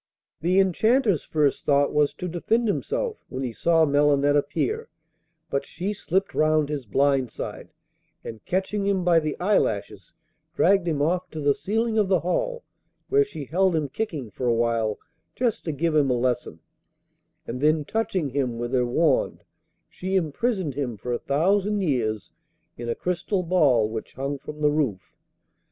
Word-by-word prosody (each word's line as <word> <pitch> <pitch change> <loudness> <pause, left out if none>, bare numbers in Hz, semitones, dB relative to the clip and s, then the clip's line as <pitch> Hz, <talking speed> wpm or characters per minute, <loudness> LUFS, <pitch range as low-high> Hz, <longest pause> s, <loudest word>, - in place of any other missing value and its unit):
The 180 +4 +2
Enchanter's 205 - +3
first 150 -3 0
thought 140 0 +2
was 150 -1 +3
to 180 - -5
defend 220 +7 0
himself 475 - -2
when 130 +1 -4
he 125 -3 -3
saw 165 +5 +3
Melinette 145 0 +3
appear, 430 - -1 0.6
but 140 0 0
she 185 +8 -4
slipped 190 0 -1
round 155 -1 +2
his 140 -6 -4
blind 135 +1 +2
side, - - -7 0.5
and 110 -2 -8
catching 195 +2 -1
him 195 -2 +1
by 175 -2 +5
the 155 -2 -4
eyelashes 110 - 0 0.4
dragged 195 -1 +3
him 150 -3 0
off 175 +4 0
to 160 - -7
the 145 -1 +3
ceiling 225 +6 -1
of 205 - +2
the 185 -3 +2
hall, 485 - -1 0.5
where 420 +1 +5
she 155 - -7
held 185 +5 +2
him 150 -3 -1
kicking 145 - -4
for 125 - -3
a 120 - +3
while 115 -2 0 0.4
just 240 -4 -1
to 160 - -1
give 155 +2 -1
him 145 -3 +3
a 125 - +2
lesson, 120 -9 -2 0.8
and 125 +2 -5
then 155 0 +2
touching 185 -7 -1
him 125 -3 -1
with 120 +2 -4
her 125 -1 +2
wand 160 +6 +1 0.4
she 190 +1 -4
imprisoned 185 - 0
him 125 -5 -3
for 120 +4 -4
a 120 - -1
thousand 200 +8 +1
years 115 - -1 0.4
in 120 0 -6
a 115 - 0
crystal 180 +2 -1
ball 145 -11 +3
which 110 0 -6
hung 140 +2 -3
from 150 +2 -9
the 150 -1 +4
roof. 135 -11 -2
155 Hz, 170 wpm, -25 LUFS, 135-190 Hz, 0.8 s, by